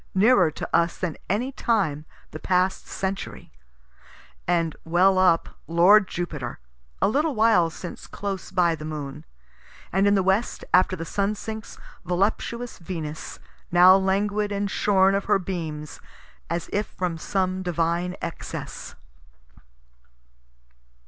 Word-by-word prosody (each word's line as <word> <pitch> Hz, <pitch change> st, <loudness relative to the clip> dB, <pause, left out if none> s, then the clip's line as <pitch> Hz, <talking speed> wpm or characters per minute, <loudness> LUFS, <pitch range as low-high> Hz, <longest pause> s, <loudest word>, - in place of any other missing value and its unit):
nearer 195 Hz, -3 st, +5 dB
to 155 Hz, -, -6 dB
us 170 Hz, 0 st, +2 dB
than 175 Hz, -4 st, -3 dB
any 235 Hz, +8 st, 0 dB
time 190 Hz, -, 0 dB, 0.3 s
the 155 Hz, -, -7 dB
past 185 Hz, +2 st, 0 dB
century) 195 Hz, 0 st, -5 dB, 1.0 s
and 170 Hz, -2 st, +1 dB
well 185 Hz, +3 st, +3 dB
up, 180 Hz, -3 st, +3 dB, 0.2 s
lord 185 Hz, +5 st, +6 dB
Jupiter, 150 Hz, -8 st, -4 dB, 0.4 s
(a -, -, +3 dB
little 290 Hz, +6 st, +1 dB
while 215 Hz, -6 st, +4 dB
since 175 Hz, +1 st, -9 dB
close 200 Hz, -2 st, -5 dB
by 175 Hz, -3 st, +2 dB
the 155 Hz, -, -7 dB
moon) 150 Hz, -3 st, -6 dB, 0.7 s
and 195 Hz, +2 st, +3 dB
in 200 Hz, -, +4 dB
the 195 Hz, -, +2 dB
west, 190 Hz, +5 st, 0 dB
after 185 Hz, +1 st, +4 dB
the 165 Hz, -2 st, -6 dB
sun 200 Hz, +4 st, -1 dB
sinks, 220 Hz, +1 st, -7 dB, 0.3 s
voluptuous 220 Hz, +6 st, -1 dB
Venus, 160 Hz, -3 st, -6 dB, 0.3 s
now 180 Hz, +2 st, +8 dB
languid 205 Hz, +2 st, +1 dB
and 200 Hz, -1 st, -2 dB
shorn 195 Hz, -1 st, +3 dB
of 195 Hz, 0 st, 0 dB
her 210 Hz, -, +3 dB
beams, 160 Hz, -5 st, -5 dB, 0.5 s
as 170 Hz, +1 st, -2 dB
if 205 Hz, +1 st, 0 dB
from 175 Hz, -3 st, -3 dB
some 185 Hz, +1 st, -1 dB
divine 175 Hz, 0 st, -1 dB
excess. 165 Hz, -, -6 dB
185 Hz, 130 wpm, -24 LUFS, 170-200 Hz, 1.0 s, now